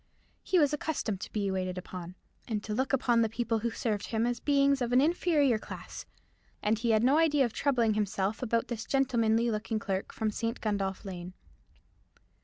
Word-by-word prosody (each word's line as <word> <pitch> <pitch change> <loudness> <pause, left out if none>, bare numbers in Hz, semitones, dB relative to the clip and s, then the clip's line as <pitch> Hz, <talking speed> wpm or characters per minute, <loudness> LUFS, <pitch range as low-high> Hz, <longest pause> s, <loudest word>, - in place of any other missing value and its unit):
He 370 - +1
was 295 -3 +4
accustomed 270 -10 -2
to - - -7
be 200 -2 -1
waited 185 -1 -2
upon, 180 -1 -7 0.3
and 210 -3 -2
to 215 - -4
look 260 +4 0
upon 245 -3 +3
the 225 - +2
people 225 0 -1
who 235 +2 -1
served 220 -3 -2
him 225 0 0
as 245 0 -1
beings 280 -1 +3
of 240 -1 -1
an 250 - +5
inferior 295 -5 +3
class: - - -9 0.6
and 215 +1 +1
he 235 0 -1
had 220 0 +3
no 275 +5 +4
idea 295 -4 +4
of 235 - -4
troubling 240 -6 +2
himself 210 0 -1
about 230 -2 0
this 225 -3 -4
gentlemanly 235 -4 +2
looking 220 +1 -2
clerk 195 -2 -3
from 220 -1 -1
St. 230 +3 -3
Gundolph 200 -2 -2
Lane. 180 -1 -7
230 Hz, 190 wpm, -30 LUFS, 210-260 Hz, 0.6 s, an